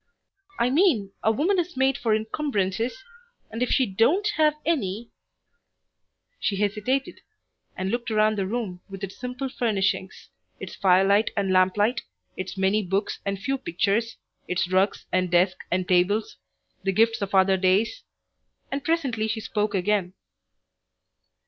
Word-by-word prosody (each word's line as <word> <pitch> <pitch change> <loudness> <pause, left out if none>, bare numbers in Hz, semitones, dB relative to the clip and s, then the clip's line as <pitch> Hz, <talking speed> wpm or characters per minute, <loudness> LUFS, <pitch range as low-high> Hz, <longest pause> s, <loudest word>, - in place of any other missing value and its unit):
"I 245 +1 +1
mean 265 - +3
a 220 - +3
woman 345 - +1
is 350 -3 -3
made 265 0 +3
for 225 -3 +1
incumbrances, 220 - -2 0.5
and 225 +2 -5
if 250 - +1
she 260 - +3
don't 245 - +2
have 305 -1 +3
any 235 - -1 0.6
" - - -51
She 200 - 0
hesitated, 210 +7 -1 0.6
and 190 +1 -2
looked 240 0 -2
around 215 0 +2
the 195 -2 -1
room 200 -5 -4
with 195 0 -9
its 195 -1 -5
simple 250 +2 -4
furnishings, 200 -6 -2 0.3
its - - -7
firelight 195 +2 +4
and 195 -2 +1
lamplight, 205 +6 +2 0.3
its 185 +1 -6
many 195 +3 +2
books 195 +3 -2
and 200 0 -1
few 270 +6 -2
pictures, 210 +3 -1 0.3
its 180 -1 0
rugs 190 +2 +1
and 185 0 +1
desk 180 +2 +3
and 180 +1 -1
tables, 190 +4 +1 0.4
the 195 - 0
gifts 225 +3 +2
of 200 -1 -2
other 190 0 +5
days, 190 - +1 0.7
and 275 0 -3
presently 270 -10 0
she 220 +1 -2
spoke 210 -1 -2
again. 190 -1 0
210 Hz, 145 wpm, -25 LUFS, 190-245 Hz, 0.7 s, other